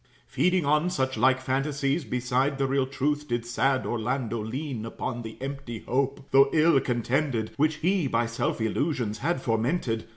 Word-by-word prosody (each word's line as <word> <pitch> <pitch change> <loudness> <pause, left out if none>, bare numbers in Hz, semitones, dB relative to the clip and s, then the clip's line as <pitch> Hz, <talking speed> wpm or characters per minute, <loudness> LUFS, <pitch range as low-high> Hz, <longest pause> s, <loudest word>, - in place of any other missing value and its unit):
Feeding 180 -3 +1
on 150 +4 +2
such 130 -6 -1
like 130 +3 +3
phantasies, 140 +3 -1
beside 125 +4 0
The 135 - +1
real 135 0 +1
truth, 145 +2 -1
did 120 -1 -2
sad 130 +2 +1
Orlando 120 0 -2
lean 130 +1 -4
Upon 120 +2 -4
the 110 -1 -9
empty 135 -4 -6
hope, 135 +1 -1
though 135 +1 +6
ill 160 -2 +5
contented, 120 -1 -1
Which 155 +2 +2
he 180 0 +1
by 120 -1 +1
self 115 +1 -2
illusions 115 -1 -1
had 170 -6 -1
fomented. 115 0 0
135 Hz, 160 wpm, -27 LUFS, 120-145 Hz, -, though